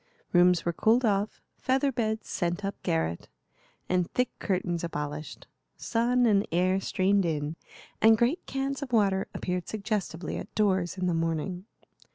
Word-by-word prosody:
Rooms 175 Hz, -1 st, +5 dB
were 170 Hz, -, 0 dB
cooled 230 Hz, +8 st, +3 dB
off, 205 Hz, 0 st, 0 dB, 0.2 s
feather 270 Hz, +2 st, +1 dB
beds 220 Hz, -3 st, -2 dB
sent 175 Hz, +2 st, -2 dB
up 200 Hz, -, -1 dB
garret, 80 Hz, +1 st, -1 dB, 0.6 s
and 180 Hz, -1 st, +1 dB
thick 250 Hz, 0 st, 0 dB
curtains 180 Hz, -3 st, -1 dB
abolished. 150 Hz, -2 st, -5 dB, 0.3 s
Sun 240 Hz, +2 st, +1 dB
and 205 Hz, -3 st, +3 dB
air 185 Hz, +3 st, +2 dB
streamed 195 Hz, +1 st, +2 dB
in, 155 Hz, -2 st, -2 dB, 0.5 s
and 220 Hz, 0 st, +7 dB
great 250 Hz, +10 st, +1 dB
cans 270 Hz, +1 st, -2 dB
of 275 Hz, -3 st, -5 dB
water 195 Hz, -3 st, +3 dB
appeared 180 Hz, -1 st, -3 dB
suggestively 200 Hz, -6 st, -3 dB
at -, -, -8 dB
doors 190 Hz, -4 st, +1 dB
in 185 Hz, -, -1 dB
the 180 Hz, -, +1 dB
morning. 165 Hz, +3 st, -2 dB
190 Hz, 150 wpm, -28 LUFS, 170-220 Hz, 0.6 s, and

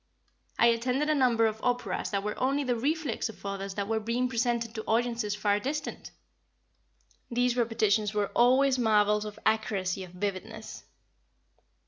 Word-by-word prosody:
I -, -, +5 dB
attended 250 Hz, +6 st, +2 dB
a -, -, +4 dB
number 245 Hz, -5 st, +3 dB
of 220 Hz, 0 st, -1 dB
operas 245 Hz, 0 st, -1 dB
that 200 Hz, -1 st, -1 dB
were 210 Hz, 0 st, -2 dB
only 275 Hz, +3 st, +1 dB
the 250 Hz, -2 st, 0 dB
reflex 280 Hz, -1 st, -1 dB
of 220 Hz, -, -12 dB
others 195 Hz, 0 st, -4 dB
that 200 Hz, -1 st, -2 dB
were 220 Hz, 0 st, 0 dB
being 230 Hz, +3 st, -1 dB
presented 235 Hz, -1 st, -1 dB
to 220 Hz, -1 st, -5 dB
audiences 230 Hz, -2 st, 0 dB
far 205 Hz, -1 st, +1 dB
distant. 290 Hz, +7 st, -4 dB, 1.2 s
These 245 Hz, 0 st, +1 dB
repetitions 220 Hz, -3 st, +1 dB
were 210 Hz, -1 st, -1 dB
always 260 Hz, +2 st, +4 dB
marvels 210 Hz, -2 st, +3 dB
of 210 Hz, -1 st, -7 dB
accuracy 200 Hz, -4 st, 0 dB
of 185 Hz, -, -10 dB
vividness. 190 Hz, 0 st, -5 dB
225 Hz, 150 wpm, -29 LUFS, 210-245 Hz, 1.2 s, I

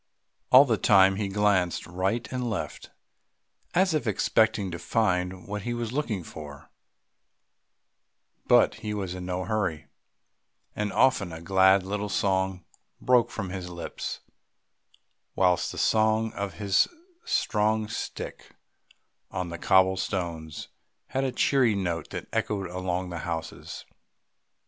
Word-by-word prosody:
All 130 Hz, +3 st, +9 dB
the 115 Hz, -5 st, +1 dB
time 95 Hz, -1 st, +5 dB
he 105 Hz, -1 st, -1 dB
glanced 95 Hz, -3 st, +1 dB
right 95 Hz, +7 st, -2 dB
and 125 Hz, -2 st, -2 dB
left 110 Hz, -, -5 dB, 0.9 s
as 185 Hz, 0 st, +3 dB
if 150 Hz, -6 st, -1 dB
expecting 110 Hz, -1 st, +2 dB
to 85 Hz, -, -5 dB
find 90 Hz, -4 st, 0 dB
what 105 Hz, +1 st, -4 dB
he 120 Hz, +4 st, -3 dB
was 120 Hz, -2 st, -3 dB
looking 120 Hz, -, -2 dB
for; 75 Hz, 0 st, -10 dB, 1.8 s
but -, -, +5 dB
he 105 Hz, -2 st, -3 dB
was 95 Hz, -3 st, -3 dB
in 90 Hz, -1 st, -6 dB
no 90 Hz, 0 st, -2 dB
hurry, 95 Hz, -8 st, -2 dB, 0.9 s
and 105 Hz, -1 st, -2 dB
often 105 Hz, -9 st, +3 dB
a 80 Hz, -, -7 dB
glad 95 Hz, +2 st, +4 dB
little 105 Hz, +2 st, -3 dB
song 95 Hz, -2 st, 0 dB, 0.3 s
broke 125 Hz, -2 st, +3 dB
from 95 Hz, -6 st, -5 dB
his 90 Hz, -1 st, -5 dB
lips, 85 Hz, -1 st, -6 dB, 1.1 s
whilst 90 Hz, -2 st, +2 dB
the -, -, -9 dB
sound 110 Hz, 0 st, +2 dB
of 100 Hz, -1 st, -4 dB
his 100 Hz, -2 st, +3 dB, 0.4 s
strong 110 Hz, 0 st, +1 dB
stick 115 Hz, -, -6 dB, 0.7 s
on 90 Hz, -1 st, -4 dB
the 85 Hz, 0 st, -6 dB
cobble 95 Hz, +1 st, +4 dB
stones 85 Hz, -5 st, -4 dB, 0.4 s
had 135 Hz, -, -1 dB
a 130 Hz, -, 0 dB
cheery 125 Hz, -5 st, +3 dB
note 85 Hz, -5 st, -2 dB
that -, -, -6 dB
echoed 100 Hz, -3 st, -1 dB
along 90 Hz, 0 st, -3 dB
the 85 Hz, -, -4 dB
houses. 80 Hz, -1 st, -6 dB
95 Hz, 130 wpm, -27 LUFS, 90-110 Hz, 1.8 s, All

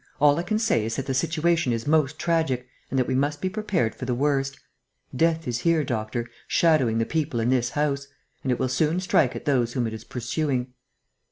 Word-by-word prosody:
All 145 Hz, +1 st, +5 dB
I -, -, +1 dB
can 215 Hz, +5 st, -1 dB
say 215 Hz, -, +2 dB
is 115 Hz, +1 st, -2 dB
that 135 Hz, -, -3 dB
the 135 Hz, -, -1 dB
situation 160 Hz, +1 st, +1 dB
is 115 Hz, -1 st, -2 dB
most 155 Hz, -1 st, +2 dB
tragic 160 Hz, -8 st, 0 dB, 0.2 s
and 135 Hz, -, -2 dB
that 130 Hz, -, +3 dB
we 130 Hz, -, -2 dB
must 145 Hz, +3 st, 0 dB
be 185 Hz, -, -1 dB
prepared 195 Hz, -, 0 dB
for 130 Hz, -, -7 dB
the 125 Hz, -1 st, 0 dB
worst. 135 Hz, 0 st, 0 dB, 0.6 s
Death 165 Hz, +2 st, +1 dB
is 120 Hz, -1 st, -1 dB
here, 165 Hz, +3 st, +2 dB
doctor, 120 Hz, -1 st, -3 dB, 0.2 s
shadowing 145 Hz, -9 st, +3 dB
the 115 Hz, -, +1 dB
people 155 Hz, -5 st, -1 dB
in 115 Hz, +1 st, +1 dB
this 125 Hz, -2 st, +2 dB
house; 140 Hz, 0 st, -1 dB, 0.3 s
and 130 Hz, -, -1 dB
it 125 Hz, -, +1 dB
will 130 Hz, -, 0 dB
soon 155 Hz, +6 st, +1 dB
strike 165 Hz, -7 st, +2 dB
at -, -, -7 dB
those 125 Hz, -5 st, +1 dB
whom 125 Hz, -3 st, 0 dB
it 110 Hz, -, -3 dB
is 110 Hz, 0 st, -7 dB
pursuing." 125 Hz, +1 st, -2 dB
135 Hz, 215 wpm, -25 LUFS, 125-160 Hz, 0.6 s, All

